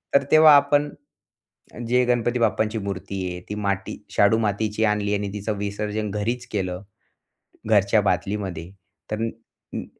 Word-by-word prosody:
तर 140 - +5
तेव्हा 155 -1 +8
आपण 145 +1 +3 1.0
जे 125 +1 +3
गणपती 120 0 +1
बाप्पांची 110 0 +1
मूर्ती 100 -1 -5
आहे 90 - -6
ती 105 - -3
माटी 100 -2 -2
शाडू 105 +2 +4
मातीची 105 0 -1
आणली 105 -1 0
आणि 100 0 -2
तिचं 105 0 -3
विसर्जन 105 +1 -3
घरीच 120 +4 -2
केलं, 90 -3 -3 0.9
घरच्या 105 0 +4
बादलीमध्ये 95 -2 -2 0.4
तर 105 - -1
नी 115 0 0 0.4
नी - - -4
105 Hz, 140 wpm, -23 LUFS, 100-115 Hz, 1.0 s, तेव्हा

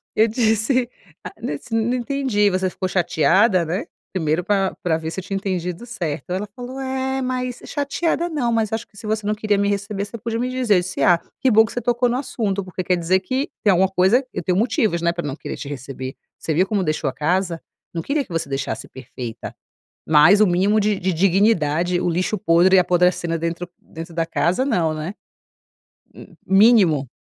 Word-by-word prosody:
Eu 220 +1 +4
disse: 230 +2 +1 0.3
"Ah, - - -8
nossa. 150 - -5
Não 225 +2 +1
entendi, 245 -5 +1
você 185 0 0
ficou 185 +1 -3
chateada?" 185 +2 +3
Né, 185 - -3 0.3
primeiro 160 -2 0
pra 195 -2 +1
pra 165 -3 +1
ver 160 0 -5
se 190 - -4
eu - - -7
tinha 195 +2 -4
entendido 185 +1 -3
certo. 170 - -5
Ela 190 +3 -2
falou: 250 +2 -7
"É, 265 0 -2
mas 255 -1 -3
chateada 320 +4 -1
não 275 -7 -1
mas 225 -2 0
acho 225 +1 -3
que 205 - -29
se 215 - -10
você 215 0 -1
não 210 +1 0
queria 210 -1 0
me 200 0 +1
receber 200 0 -2
você 230 - -8
podia 230 +1 -3
me 250 +1 -1
dizer". 255 -5 +2
Eu - - +5
disse: 180 +1 -5
"Ah, 175 -2 +5 0.2
que 265 - +4
bom 220 0 +6
que 225 - -9
você 245 - -3
tocou 245 +1 +1
no 245 - 0
assunto 210 -7 -2
porque 185 0 -5
quer 180 +1 +2
dizer 175 +2 +2
que 260 +9 -2
tem 205 - +5
alguma 190 +1 +3
coisa 190 +8 +3
eu - - -3
tenho 180 -1 +1
motivos, 220 - +1
né, 170 0 +2
pra 175 0 -4
não 140 -2 -3
querer - - -6
te - - -7
receber. 130 -1 -6 0.2
Você 160 - -2
viu 180 +5 +3
como 205 -2 0
deixou 155 -4 -1
a - - -7
casa? 170 +2 -1 0.3
Não 165 - -2
queria 280 - -1
que - - -18
você 165 -2 -2
deixasse 135 0 -3
perfeita, 125 -2 -8 0.5
mas 160 +7 +6
o - - +6
mínimo 190 +4 +2
de 210 0 +1
dignidade. 180 -2 +2
O - - 0
lixo 180 +5 0
podre 180 +2 +4
apodrecendo 175 -1 +2
dentro 170 +2 -3
dentro 165 +1 -10
da 165 0 0
casa 170 +6 0
não, 170 - +1
né?". 155 +5 -5 1.0
Hum, - - -13
mínimo. 195 - +5
190 Hz, 205 wpm, -21 LUFS, 170-225 Hz, 1.0 s, bom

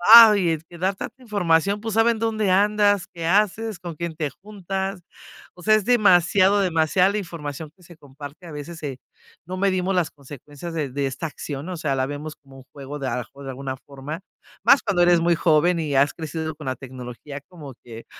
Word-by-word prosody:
ay, 210 -6 +9
es 160 -1 -3
que 170 +1 -14
dar 190 +3 0
tanta 245 +6 -8
información, 200 -3 +1
pues 225 -2 -4
saben 225 0 +3
dónde 220 -3 0
andas, 205 0 +3
qué 170 -1 -5
haces, 210 +2 +1
con 170 -2 -7
quién 170 0 -5
te 155 -2 -2
juntas. 195 -1 -4 0.5
O 180 - -14
sea, 215 +4 +5
es 215 -3 0
demasiado 200 -3 +4
demasiada 180 +1 +3
la 205 - -1
información 155 -4 -7
que 185 - -23
se 175 -1 -15
comparte. 145 +3 -11
A - - -9
veces 150 +3 -7
se 135 -4 -6 0.5
no 185 +2 -5
medimos 190 -1 +1
las 175 -3 +1
consecuencias 145 +3 -10
de 150 -4 -2
de 140 +1 -1
esta 135 +5 -3
acción, 145 0 -7
o 180 - -4
sea, 150 -4 -1
la 130 0 0
vemos 145 +2 -6
como 135 -2 -17
un 135 - -13
juego 140 +1 -8
de, 135 - -3
a 130 - -2
lo - - -1
mejor, 140 +3 -10
de 135 - -5
alguna 130 0 -5
forma, 145 +4 -7 0.4
más 275 - +6
cuando 180 -3 +2
eres 175 -1 +5
muy 170 +1 +3
joven 165 +1 +3
y 150 -3 -2
has 140 +1 +4
crecido 160 -1 -5
con 150 -3 -9
la 130 - -1
tecnología 130 +2 -9
como 150 -7 -10
que 115 -1 -10
165 Hz, 210 wpm, -23 LUFS, 145-195 Hz, 0.5 s, ay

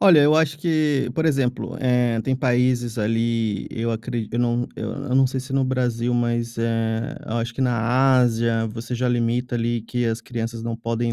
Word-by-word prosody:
Olha, 180 -6 +7
eu 150 +2 +5
acho 155 -2 +2
que 150 -5 +1
por 160 - 0
exemplo, 135 -4 0
eh, 125 -3 +2
tem 130 +2 0
países 125 -2 +1
ali 115 -1 0
eu 115 0 -2
acre 115 0 -4
eu 120 - -1
não 120 0 +1
eu 140 -2 -4
não 135 0 +5
sei 130 +1 -3
se 130 +1 -7
no 135 -1 +2
Brasil, 125 -2 0
mas, 120 -1 -1
eh, 115 0 -1
eu 115 - -3
acho 115 0 -2
que - - -5
na 125 +2 +3
Ásia 115 -2 +2
você 115 +3 -6
já 125 +1 0
limita 120 +1 0
ali 115 -1 -1
que 120 +1 -2
as 115 0 -1
crianças 115 -1 -5
não 115 -1 -3
podem 115 0 -2
120 Hz, 195 wpm, -23 LUFS, 115-130 Hz, -, Olha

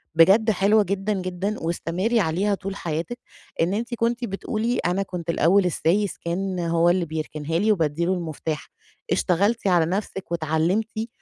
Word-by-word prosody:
بجد 195 +7 +6
حلوة 205 +2 +3
جدًا، 200 +2 -1
جدًا، 185 +2 -3
واستمري 175 +7 0
عليها 190 +3 +1
طول 195 +1 -6
حياتِك، 170 +6 -4 0.4
إن 175 +4 +2
أنتِ 235 +3 -3
كنتِ 235 +1 0
بتقولي 225 +3 -2
أنا 180 +3 +1
كنت 175 -3 -7
الأول 180 +4 +4
السايس 180 +3 +1
كان 185 +2 -3
هو 170 0 +2
اللي 175 0 +2
بيركنها 155 0 -3
لي 215 +3 +3
وبادّي 165 -3 +1
له 185 - +2
المفتاح، 160 -3 -4 0.4
اشتغلتِ 200 +5 +1
على 175 -3 +4
نَفْسِك 190 0 -4
واتعلّمتِ 170 +8 0
185 Hz, 150 wpm, -24 LUFS, 165-210 Hz, 0.4 s, بجد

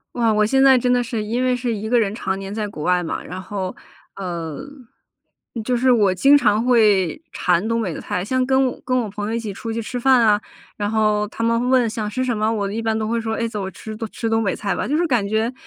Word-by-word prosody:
哇， 230 -2 +2
我 215 0 +3
现 265 +5 +3
在 270 -1 +7
真 250 0 +1
的 245 0 +2
是 230 -3 -3
因 235 +4 -1
为 255 -1 +2
是 245 -1 -2
1 215 +1 -5
个 240 +1 +3
人 205 -3 0
常 190 -4 -2
年 195 0 -6
在 215 -1 -2
国 155 -7 -7
外 180 +1 +2
嘛， 165 - -4
然 185 - -7
后， 190 -1 -5 0.4
呃， 170 -5 -5 1.0
就 245 +2 0
是 255 +2 +3
我 205 -6 +3
经 275 +10 +5
常 220 -5 +3
会 215 - +3
馋 180 +2 +1
东 230 0 0
北 190 -7 -2
的 - - -7
菜。 180 +1 -3
像 255 +4 +1
跟 265 +1 +3
我 250 - -6
跟 255 0 0
我 240 -3 0
朋 205 +1 -5
友 225 - -1
一 - - -1
起 215 -3 -5
出 225 +3 -6
去 225 - -3
吃 245 +3 -5
饭 260 +1 +5
啊， 210 -2 +4 0.4
然 205 -1 -1
后 210 -1 +1
他 230 - -5
们 230 +2 +1
问 255 -3 +4
想 215 -1 -3
吃 255 +5 -2
什 240 -3 0
么， 215 +1 0
我 200 -3 -2
一 225 +2 -3
般 225 -1 0
都 215 - -2
会 230 +1 -1
说： 220 0 -2
“哎， 230 - -1
走， 210 -3 -5
我 190 - -4
吃 215 +4 -9 0.2
吃 230 - -4
东 225 0 +1
北 195 - 0
菜 200 -3 -2
吧。 - - -2
“就 300 - +1
是 345 - +2
感 245 -10 +1
觉， 220 +4 0
220 Hz, 285 characters per minute, -21 LUFS, 205-245 Hz, 1.0 s, 在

